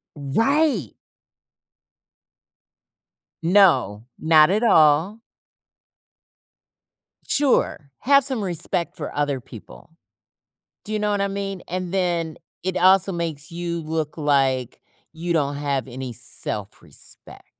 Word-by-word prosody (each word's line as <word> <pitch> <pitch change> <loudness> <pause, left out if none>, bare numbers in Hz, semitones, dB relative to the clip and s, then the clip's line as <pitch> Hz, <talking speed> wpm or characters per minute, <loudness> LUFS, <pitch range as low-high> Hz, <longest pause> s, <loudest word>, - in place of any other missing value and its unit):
Right. 225 - +1 2.5
No, 165 - +3
not 155 -1 +5
at 210 +5 +1
all. 165 0 +4 2.1
Sure, 255 - +2
have 280 +1 +4
some 255 -5 -1
respect 175 -1 -2
for 150 - -7
other 145 -2 -1
people. 120 -3 -14 0.9
Do 215 - -6
you 215 - 0
know 210 0 0
what 205 -1 0
I 200 - +1
mean? 195 -1 -5
And 180 0 -4
then 175 -4 -1 0.3
it 185 0 -2
also 190 +1 +4
makes 165 -4 -4
you 170 0 -4
look 155 0 -4
like 135 -4 0 0.3
you 170 +2 -3
don't 145 -3 0
have 140 -2 -2
any 130 0 -7
self-respect. 105 - -7
165 Hz, 105 wpm, -22 LUFS, 140-195 Hz, 2.5 s, not